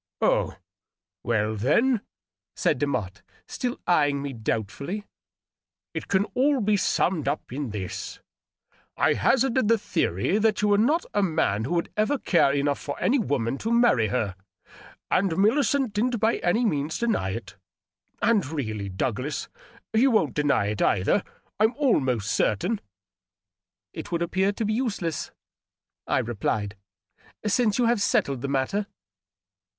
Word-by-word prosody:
" - - -68
Oh, - - +2 0.7
well, 110 -2 0
then," 210 - +2 0.5
said 145 - +1
Demotte, 105 -9 -2 0.3
still 250 -1 -3
eying 145 -5 +3
me 140 -1 -4
doubtfully, 115 - -3 0.5
" - - -68
it - - -5
can 195 0 +2
all 275 +2 +2
be 210 -1 +2
summed 180 -5 +1
up 145 -3 -3
in 140 -1 -3
this: 100 -4 -5 0.8
I - - +3
hazarded 260 -2 +2
the 230 +1 +4
theory 175 - 0
that 215 -1 +1
you 210 - +3
were 205 0 +4
not 300 +10 +2
a 205 - +2
man 115 - +1
who 175 - -1
would 170 - -1
ever 215 +7 +1
care 170 - +3
enough 140 0 0
for 145 - -6
any 270 +3 +2
woman 135 - -1
to 225 - -2
marry 235 - +4
her, 105 -4 -1 0.8
and 180 -3 +2
Millicent 260 +3 +2
didn't 235 +3 0
by 225 +2 +2
any 220 +8 +1
means 150 -5 -1
deny 225 - 0
it. 105 -1 -6 0.7
And 225 -4 +4
really, 110 -10 -4
Douglas, 125 +9 -3 0.4
you 240 +5 +4
won't 190 - +2
deny 145 -8 +2
it, 105 -1 -3
either, 100 - +2 0.4
I'm 220 +3 +3
almost 130 - +1
certain," 185 - 0 0.6
" 95 0 -67
It - - -7
would 170 0 0
appear 190 +3 +1
to 215 +2 -3
be 215 - 0
useless," 205 - -2 0.8
I - - +1
replied, 105 -2 -2 0.4
" - - -26
since 215 0 +2
you 245 - +3
have 230 -2 +2
settled 140 -9 +1
the 140 - -2
matter." 140 +10 -1
170 Hz, 150 wpm, -25 LUFS, -, 0.8 s, the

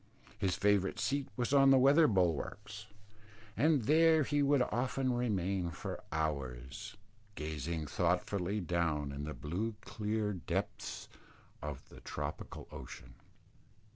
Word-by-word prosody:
His 95 -2 +1
favourite 100 -2 +2
seat 140 0 0
was 125 +2 0
on 135 -1 +7
the 135 - +7
weather 140 +5 +6
bulwarks; 100 - -1 0.7
and 145 +1 +3
there 160 +4 +5
he 145 +1 +1
would 140 -2 +4
often 130 +2 0
remain 100 -7 0
for 85 - -6
hours, 75 - -3 0.4
gazing 80 +1 -3
thoughtfully 90 +5 0
down 80 -4 0
in 70 +1 -5
the 75 - -5
blue 95 +10 -3
clear 105 -1 -2
depths 90 - -4 0.5
of 75 -3 -6
the - - -13
tropical - - -6
ocean. - - -9
100 Hz, 120 wpm, -34 LUFS, 80-125 Hz, 0.7 s, on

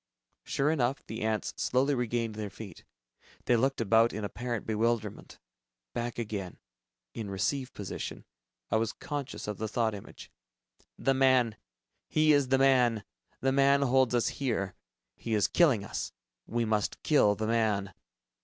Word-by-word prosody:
Sure 145 +3 +1
enough... 135 -3 0
the 110 +1 -6
ants 110 -1 -1
slowly 135 +3 +2
regained 120 -3 -1
their 105 -1 -5
feet. 100 -3 -10 0.6
They 120 - +4
looked 135 +4 +1
about 115 +1 +4
in 105 +1 -4
apparent 120 +2 -4
bewilderment. 110 -1 -1 0.6
Back 120 0 -3
again, 105 -6 -4 0.6
in 110 -3 -5
"receive" 130 +7 -1
position, 100 - -6 0.5
I - - +4
was 110 0 0
conscious 145 -9 -5
of 105 -2 -4
the 110 - -2
thought 110 0 0
image, 100 - -10 0.7
"The 135 - +2
man... 130 -4 +3 0.5
he 155 0 +4
is 145 -2 +3
the 135 +1 +3
man. 125 -5 +4 0.4
The 135 - +2
man 140 +1 +4
holds 130 -2 +3
us 120 - +2
here. 110 -8 -2 0.4
He 115 -2 -2
is 105 - +3
killing 135 - +3
us. - - -4 0.3
We 120 0 0
must 105 -2 -1
kill 105 -9 +4
the 110 +2 -3
man." 110 -4 +1
115 Hz, 150 wpm, -30 LUFS, 110-135 Hz, 0.7 s, They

